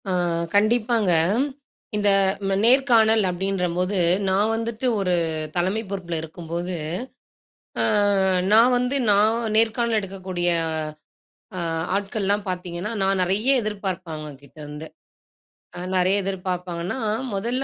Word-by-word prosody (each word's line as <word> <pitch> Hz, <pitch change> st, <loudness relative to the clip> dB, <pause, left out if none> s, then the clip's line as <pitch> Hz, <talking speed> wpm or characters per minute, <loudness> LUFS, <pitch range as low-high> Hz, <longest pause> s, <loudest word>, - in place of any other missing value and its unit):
ஆ, -, -, 0 dB, 0.4 s
கண்டிப்பாங்க, 215 Hz, -1 st, +2 dB, 0.8 s
இந்த, 205 Hz, -1 st, +2 dB, 0.4 s
ம -, -, +1 dB
நேர்காணல் 230 Hz, -4 st, +5 dB
அப்படின்றபோது, 180 Hz, 0 st, -1 dB, 0.3 s
நான் 205 Hz, +4 st, +2 dB
வந்துட்டு 230 Hz, +2 st, -4 dB
ஒரு 180 Hz, -2 st, +1 dB, 0.4 s
தலைமை 185 Hz, +5 st, 0 dB
பொறுப்பில 175 Hz, -4 st, -4 dB
இருக்கும்போது, 170 Hz, +2 st, -5 dB, 1.1 s
ஆ, -, -, +3 dB, 0.7 s
நான் 230 Hz, +4 st, +6 dB
வந்து 250 Hz, +3 st, 0 dB
நான் 210 Hz, +3 st, +4 dB, 0.2 s
நேர்காணல் 230 Hz, 0 st, +2 dB
எடுக்கக்கூடிய 185 Hz, -2 st, -4 dB, 1.1 s
ஆ, -, -, -2 dB, 0.4 s
ஆட்கள்லாம் 200 Hz, 0 st, -1 dB
பார்த்தீங்கன்னா, 180 Hz, +1 st, -4 dB
நான் 195 Hz, 0 st, +1 dB
நிறைய 200 Hz, +7 st, 0 dB
எதிர்பார்ப்பேன், 190 Hz, -5 st, -4 dB
அவங்க 155 Hz, -1 st, -7 dB
கிட்ட 140 Hz, -, -19 dB
இருந்து. 150 Hz, +2 st, -8 dB, 0.9 s
அ, -, -, -7 dB, 0.2 s
நிறைய 185 Hz, +1 st, +3 dB
எதிர்பார்ப்பாங்கன்னா, 180 Hz, 0 st, -3 dB, 0.4 s
முதல்ல 235 Hz, +7 st, -1 dB
195 Hz, 105 wpm, -23 LUFS, 180-220 Hz, 1.1 s, நான்